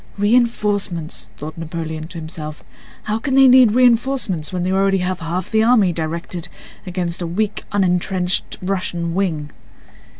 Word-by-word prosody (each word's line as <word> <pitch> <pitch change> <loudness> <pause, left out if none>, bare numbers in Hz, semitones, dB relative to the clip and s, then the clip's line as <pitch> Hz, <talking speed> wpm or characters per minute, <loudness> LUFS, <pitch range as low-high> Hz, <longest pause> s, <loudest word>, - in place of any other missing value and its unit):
"Reinforcements!" 205 -6 0
thought 155 +2 -7
Napoleon 160 -1 -5
to 170 0 -10
himself. 155 -2 -7 0.4
"How 215 +1 -1
can 265 +3 -1
they 270 0 +7
need 250 -4 +7
reinforcements 240 - +2
when 180 -1 -2
they 185 - 0
already 195 0 +2
have 185 0 -2
half 170 +2 -4
the 220 -1 +3
army 220 -6 +4
directed 170 +2 -4 0.4
against 180 -1 -2
a 170 - -2
weak, 205 +5 -2
unentrenched 185 -1 0
Russian 175 -3 -2
wing?" 160 -6 -1
185 Hz, 140 wpm, -20 LUFS, 165-210 Hz, 0.4 s, they